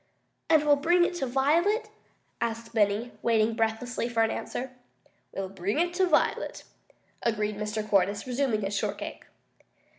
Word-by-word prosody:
"And 310 -2 +5
we'll 290 -1 +5
bring 345 +4 +4
it 355 - -2
to 270 - -1
Violet?" 320 - +2 0.5
asked 230 0 -3
Benny, 215 +2 +1
waiting 225 -1 +2
breathlessly 225 +2 -1
for 230 -1 +2
an 225 - +1
answer. 255 +1 -4 0.6
"We'll 195 0 -4
bring 195 +3 -3
it 345 +2 +1
to 370 +1 +2
Violet," 325 - +1 0.6
agreed 215 -2 0
Mr. 210 0 -3
Cordyce, 200 0 +2
resuming 250 -3 0
his 195 +1 -2
shortcake. - - -4
230 Hz, 145 wpm, -28 LUFS, 210-285 Hz, 0.6 s, And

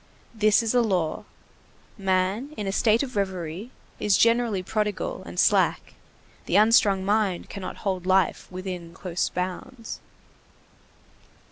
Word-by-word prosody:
This 215 0 +3
is 225 - 0
a 245 - +4
law. 180 -8 -1 0.7
Man, 195 +8 -1
in 210 - -3
a 195 - -1
state 220 +4 +3
of 255 -2 -6
reverie, 190 +1 -3 0.3
is 205 -2 +3
generally 230 -4 +2
prodigal 210 - -2
and - - -5
slack; - - +2 0.5
the - - 0
unstrung 205 -3 +4
mind 205 -3 0
cannot 195 -2 -6
hold 185 -2 -1
life 190 0 +2
within 180 -2 -6
close 180 -2 -2
bounds. 185 +7 -5
200 Hz, 125 wpm, -25 LUFS, 185-225 Hz, 0.7 s, a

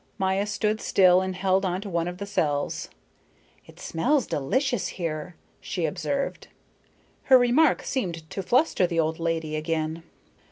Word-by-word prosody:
Maya 190 +2 0
stood 210 +1 -1
still 185 -1 +5
and 185 0 -3
held 190 +1 +1
on 185 -1 -1
to 205 - -7
one 170 -2 -1
of 175 0 -5
the 200 - -5
cells. 150 -8 -1 0.8
"It - - -16
smells 255 - +1
delicious 245 - 0
here," 165 -1 -5 0.2
she 175 -3 -3
observed. 275 - -3 0.8
Her 260 - +8
remark 250 +5 +3
seemed 170 -11 -3
to 195 - -3
fluster 240 - +2
the 170 -1 -1
old 160 0 0
lady 165 -2 -2
again. 160 +1 -2
185 Hz, 150 wpm, -26 LUFS, 165-210 Hz, 0.8 s, Her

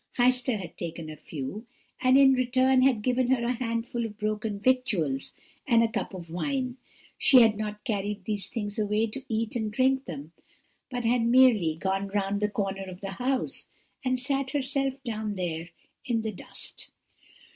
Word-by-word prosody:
Heister 250 -2 +3
had 180 - -8
taken 165 -2 -5
a - - -8
few, 155 - -6 0.3
and 255 +1 +5
in 270 -1 +7
return 255 +1 +3
had 255 -5 +3
given 255 +1 +2
her 255 -2 +2
a 245 - +1
handful 235 0 -2
of 215 -2 -5
broken 215 -1 -2
victuals 205 - +1 0.4
and 230 -3 +5
a - - +3
cup 200 - -3
of 170 -3 -9
wine; 255 - -2 0.4
she 265 -5 +8
had 220 -2 +4
not 210 0 -5
carried 205 -4 -2
these 210 -2 -2
things 205 -2 -4
away 210 +1 +2
to 230 +5 -6
eat 225 0 -1
and 220 -3 -1
drink 265 +3 +2
them, 155 -2 -7 0.6
but 245 -2 -3
had 240 +1 +3
merely 230 -9 +5
gone 195 +3 -1
round 200 0 -1
the 210 - +2
corner 195 -1 -2
of 185 -1 -9
the 195 -1 -4
house, 255 +5 -2 0.4
and 255 -1 +1
sat 270 +1 0
herself 275 -1 0
down 215 -4 -3
there 170 -2 -3 0.3
in 230 -3 0
the 220 - -2
dust. 190 - -6
225 Hz, 175 wpm, -28 LUFS, 200-255 Hz, 0.6 s, she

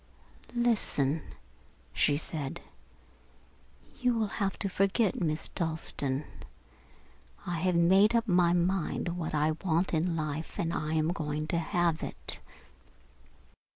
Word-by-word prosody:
"Listen," 180 - +1 0.7
she 145 -1 +3
said. 150 -3 -4 1.4
"You 250 -2 +2
will 215 -2 -2
have 195 -1 0
to 200 - -2
forget 195 +2 +1
Miss 155 -2 0
Dalstan. 155 -4 -2 1.2
I 175 -2 -2
have 180 +1 +1
made 190 +6 +5
up 230 0 +2
my 175 -3 +4
mind 175 0 0
what 170 -2 -3
I 150 +1 +2
want 175 0 +1
in 165 +1 +1
life 155 0 -4
and 170 0 -1
I 155 0 -1
am 155 +1 +2
going 155 -3 -2
to 170 - +1
have 170 -1 +1
it. - - -6
170 Hz, 120 wpm, -30 LUFS, 155-190 Hz, 1.4 s, made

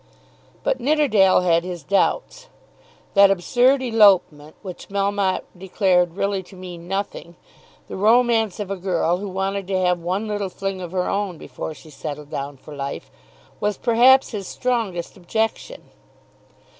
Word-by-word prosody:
But 255 - 0
Nidderdale 245 -10 +3
had 170 -2 +2
his 175 -3 -6
doubts. - - 0 0.7
That 200 -1 +7
absurd 245 +8 +2
elopement, 195 -10 +3
which 185 -3 -9
Melmotte 200 -1 0
declared 180 -2 +1
really 200 -1 -1
to 190 +1 -16
mean 175 -2 -9
nothing, 195 -3 -4 0.5
the - - -7
romance 225 0 +3
of 200 -2 -4
a 195 - -2
girl 175 -2 0
who 200 +1 -6
wanted 195 0 -3
to 190 -1 0
have 180 -1 +1
one 185 +6 -2
little 205 -2 -2
fling 195 0 -4
of 175 -2 -7
her 180 -1 -1
own 200 -4 -2
before 150 +2 -7
she 155 - -15
settled 150 0 -7
down 140 0 -5
for 145 +3 -12
life, 140 0 -6 0.5
was 210 0 -1
perhaps 255 +3 +4
his 200 -4 -5
strongest 225 -9 -2
objection. 220 - -3
195 Hz, 145 wpm, -22 LUFS, 175-210 Hz, 0.7 s, That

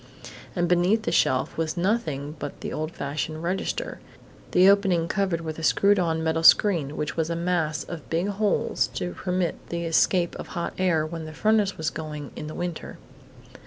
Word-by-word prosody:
And 175 -1 +1
beneath 180 +6 +3
the - - -1
shelf 130 0 +2
was 160 +1 -1
nothing 160 -7 -1
but - - -6
the - - -4
old 155 +1 -3
fashioned 155 +2 -4
register, 180 +3 -2 0.5
the 185 +1 +5
opening 195 -4 +4
covered 190 -3 0
with 160 -1 -5
a - - -5
screwed 200 +5 +4
on 160 -2 0
metal 160 0 0
screen 165 -5 +5
which 150 - -3
was 160 0 -1
a 170 - -1
mass 165 -3 0
of 170 -4 -8
big 170 +4 0
holes 205 +1 +1
to 90 -1 -2
permit 180 - -2
the 170 0 -3
escape 170 +1 +2
of - - -7
hot 170 - -2
air 170 -4 +2
when 160 0 -6
the 155 - -8
furnace 215 0 +2
was 160 - -1
going 150 -3 -6
in 150 - -6
the 155 - -7
winter.... 175 -2 -5
170 Hz, 185 wpm, -25 LUFS, 155-185 Hz, 0.5 s, the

